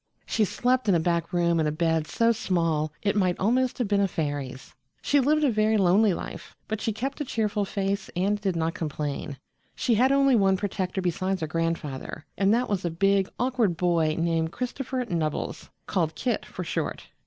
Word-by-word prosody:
She 215 - +1
slept 250 +2 +1
in 190 - +5
a - - +3
back 170 0 0
room 170 -1 +2
in 155 - +2
a - - +1
bed 160 0 0
so 230 +6 +2
small 165 -8 0
it 205 0 +1
might 185 -4 +2
almost 245 +5 +1
have 245 - 0
been 200 0 +2
a 200 - +3
fairy's. 145 -6 -4 0.3
She 285 - +3
lived 300 +3 +3
a 280 - +4
very 215 0 +2
lonely 195 +2 +4
life, 175 - -6
but 220 0 -3
she 225 - 0
kept 270 +7 -4
a - - +1
cheerful 215 -5 -1
face 195 0 -2
and 200 +3 0
did 190 -4 0
not 165 0 0
complain. 150 -3 -4 0.4
She 250 - +1
had 250 +5 +4
only 275 -1 +4
one 195 -3 +3
protector 190 -1 -2
besides 185 +1 -1
her - - 0
grandfather, 160 -3 -3
and 195 0 +2
that 240 +3 +2
was 200 -3 -1
a 175 - 0
big, 195 +3 +2
awkward 245 -8 +1
boy 165 -3 +2
named 165 -1 0
Christopher 250 +2 -3
Nubbles, 165 -7 -3 0.2
called 165 -5 -1
Kit 245 +6 -2
for - - -6
short. - - -3
195 Hz, 195 wpm, -26 LUFS, 165-225 Hz, 0.4 s, in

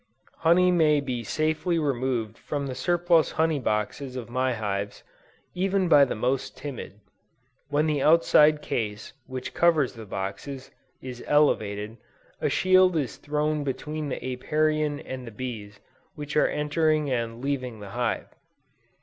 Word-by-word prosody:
Honey 180 +2 +4
may 155 -4 +4
be 125 -4 -3
safely 155 - 0
removed 130 -7 -1
from 145 +2 -4
the 135 - -4
surplus 175 +2 +2
honey 160 -2 +1
boxes 125 +4 -2
of 120 -2 -6
my 130 +1 +1
hives, 100 -2 -3 0.5
even 190 +1 +1
by 145 -4 +7
the - - -3
most 125 +4 -1
timid. 130 -7 -7 0.7
When 150 +1 +2
the 150 -3 0
outside 155 -1 +5
case 105 -2 -3
which 130 0 -6
covers 160 -6 +3
the 110 -3 -10
boxes, 100 +9 -5 0.3
is 125 -2 -7
elevated, 110 -7 +1 0.4
a - - +1
shield 185 -1 +4
is 140 -5 -2
thrown 150 0 -1
between 150 +2 -4
the - - -2
Apiarian 150 +3 0
and 130 -2 -7
the - - -7
bees 105 -4 -7 0.4
which 150 -1 -6
are 150 - +4
entering 150 -1 +1
and 115 -2 -2
leaving 130 -4 -3
the 100 -1 -9
hive. 120 +2 -1
140 Hz, 140 wpm, -26 LUFS, 120-155 Hz, 0.7 s, by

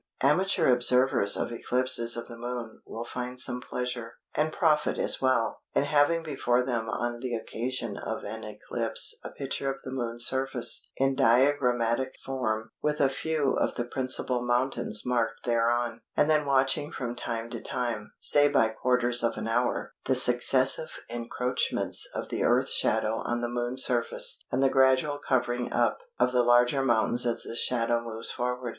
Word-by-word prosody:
Amateur 175 +4 +3
observers 125 -4 +3
of - - -2
eclipses 120 0 0
of 120 - -6
the 120 - -9
Moon 120 -1 -6
will 115 +1 -6
find 125 +1 -6
some 125 -1 -2
pleasure, 125 -2 -4 0.2
and 155 +1 0
profit 155 -3 +1
as - - +2
well, 130 -3 +1
in - - +3
having 145 +3 +2
before 125 -5 0
them 120 -3 -2
on 120 +1 -3
the 125 -1 -3
occasion 120 +3 -4
of - - -5
an - - -6
eclipse - - -1
a - - -6
picture 135 0 -3
of 135 - -8
the 130 - -7
Moon's 120 -2 -1
surface 130 -2 -1
in 135 0 +2
diagrammatic 130 -1 +2
form 110 -5 -2
with 150 0 -1
a 140 - +4
few 145 0 0
of - - 0
the 120 - -1
principal 130 0 -1
mountains 120 -3 0
marked 115 -2 -1
thereon; 120 0 0 0.2
and - - +4
then 150 -2 +2
watching 135 +2 +2
from 120 -2 -4
time 115 -1 -4
to 115 - -5
time 115 -4 -4
(say 145 0 +5
by 110 -5 +3
quarters 120 +1 +1
of 115 - 0
an - - -4
hour) 120 +2 -1
the 130 - +2
successive 130 +4 +3
encroachments 120 +1 -1
of - - -4
the - - -3
Earth's - - +3
shadow 110 0 +1
on 120 0 -2
the 120 - -1
Moon's 120 +2 +1
surface 120 -2 0
and 130 +2 +1
the - - +5
gradual 135 +2 +3
covering 125 -3 -1
up - - +1 0.2
of - - +2
the 125 -1 +3
larger 120 +3 +4
mountains 120 -1 +2
as 120 - -1
the - - -6
shadow 120 -1 +1
moves 115 -1 -5
forward. 125 0 -3
125 Hz, 170 wpm, -28 LUFS, 120-135 Hz, 0.2 s, say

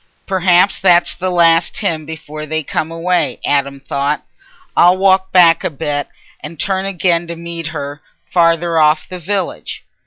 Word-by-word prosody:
"Perhaps 185 0 +2
that's 175 -2 +4
the 185 +1 -3
last 170 -1 +3
hymn 160 -7 -2
before 155 -1 -8
they 155 +1 -2
come 155 +3 -3
away," 175 +2 -1
Adam 140 -1 0
thought. 140 +2 -2 0.5
"I'll 180 +2 +5
walk 190 0 +2
back 170 -2 +5
a - - 0
bit 145 -1 -3 0.3
and 150 0 -10
turn 190 0 -1
again 175 -3 0
to 170 - -5
meet 170 -1 -6
her, 145 -2 -6 0.2
farther 165 -1 +2
off 155 0 +3
the 185 - -8
village." 190 +1 -4
170 Hz, 155 wpm, -16 LUFS, 155-180 Hz, 0.5 s, I'll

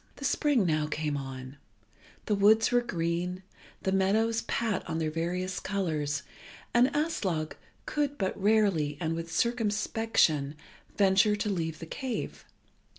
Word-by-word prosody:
The 275 - -6
spring 275 -6 +2
now 155 -2 +1
came 150 -1 -2
on: 135 -1 -6 0.7
the 210 - +1
woods 210 +3 +5
were 245 0 +4
green, 180 -3 -2 0.4
the 190 - +1
meadows 220 +4 +2
pat 225 -5 -1
on 160 - -1
their 160 -1 -1
various 180 +3 -2
colours, 155 -7 -1 0.5
and 240 +2 +6
Aslog 190 - -1 0.3
could 290 -1 -1
but 190 -2 -1
rarely, 195 -9 +2
and 160 -1 -1
with 165 0 -5
circumspection, 210 - +1 0.4
venture 200 +1 +4
to 210 0 -2
leave 165 -4 -2
the 165 - -8
cave. 255 - -5
190 Hz, 135 wpm, -29 LUFS, 160-220 Hz, 0.7 s, and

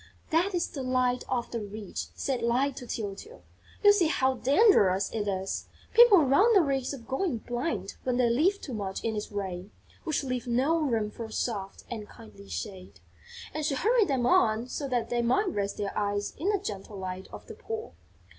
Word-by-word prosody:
"That 355 +4 +2
is 345 - 0
the 275 - -6
Light 255 -1 +1
of 245 -2 -2
the 235 - -2
Rich," 205 0 -6
said 265 -3 -2
Light 255 +4 +1
to 245 - -7
Tyltyl. 220 - -6 0.4
"You 410 0 +8
see 370 -5 +3
how 265 -4 +2
dangerous 245 - +4
it 210 -2 -2
is. 190 -1 -2 0.3
People 460 -7 +8
run 385 - +5
the 385 - +7
risk 270 -3 -1
of 235 -4 -13
going 270 0 -1
blind 240 - -3
when 250 -1 0
they 250 -1 +3
live 325 +13 +2
too 265 - -7
much 195 -3 -4
in 225 -1 -1
its 210 0 -4
rays, 190 -3 -4 0.4
which 310 -4 -1
leave 255 -2 -3
no 265 +8 +2
room 230 -8 0
for 225 +1 -7
soft 205 -3 -3
and 215 -3 -6
kindly 200 -3 -14
shade." 185 - -7 0.5
And 310 - -3
she 290 -2 0
hurried 445 - +3
them 265 -5 0
on 235 -9 +3
so 280 - -3
that 245 -3 -1
they 240 0 +1
might 255 - +2
rest 200 - -2
their 205 -1 -3
eyes 205 0 -1
in 350 +7 -1
the 415 - +3
gentle 205 - -6
Light 185 0 -5
of - - -10
the 450 - -9
Poor. 450 0 -6
245 Hz, 195 wpm, -28 LUFS, 210-310 Hz, 0.5 s, You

